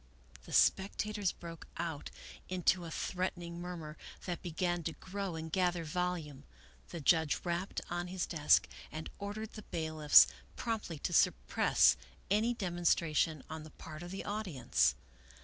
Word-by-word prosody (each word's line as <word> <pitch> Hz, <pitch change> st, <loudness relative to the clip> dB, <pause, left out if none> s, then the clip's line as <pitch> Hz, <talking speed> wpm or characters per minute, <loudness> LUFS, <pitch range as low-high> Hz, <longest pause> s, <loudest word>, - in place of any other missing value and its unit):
The -, -, -11 dB
spectators 205 Hz, 0 st, +2 dB
broke 165 Hz, -1 st, -10 dB
out 160 Hz, -4 st, -3 dB, 0.4 s
into 180 Hz, -1 st, +2 dB
a -, -, -6 dB
threatening 175 Hz, 0 st, -3 dB
murmur 165 Hz, -4 st, -6 dB, 0.3 s
that 175 Hz, -2 st, -3 dB
began 175 Hz, 0 st, -1 dB
to 165 Hz, -, -1 dB
grow 195 Hz, -1 st, -5 dB
and 160 Hz, 0 st, -5 dB
gather 175 Hz, -2 st, +1 dB
volume. 165 Hz, -4 st, -2 dB, 0.5 s
The 170 Hz, -, -5 dB
judge 160 Hz, 0 st, +3 dB
rapped 175 Hz, +2 st, -2 dB
on 175 Hz, 0 st, -3 dB
his 185 Hz, 0 st, -2 dB
desk 150 Hz, -4 st, +4 dB, 0.2 s
and 155 Hz, 0 st, -6 dB
ordered 205 Hz, +2 st, -5 dB
the 215 Hz, -, -7 dB
bailiffs 155 Hz, -5 st, +6 dB, 0.3 s
promptly 220 Hz, -8 st, -3 dB
to -, -, -3 dB
suppress -, -, +4 dB, 0.3 s
any 225 Hz, +4 st, +3 dB
demonstration 170 Hz, -, +1 dB
on 160 Hz, 0 st, -6 dB
the 155 Hz, -, -10 dB
part 155 Hz, +1 st, -10 dB
of 175 Hz, -, -7 dB
the 190 Hz, +2 st, -5 dB
audience. 190 Hz, -, +1 dB
175 Hz, 140 wpm, -34 LUFS, 160-190 Hz, 0.5 s, bailiffs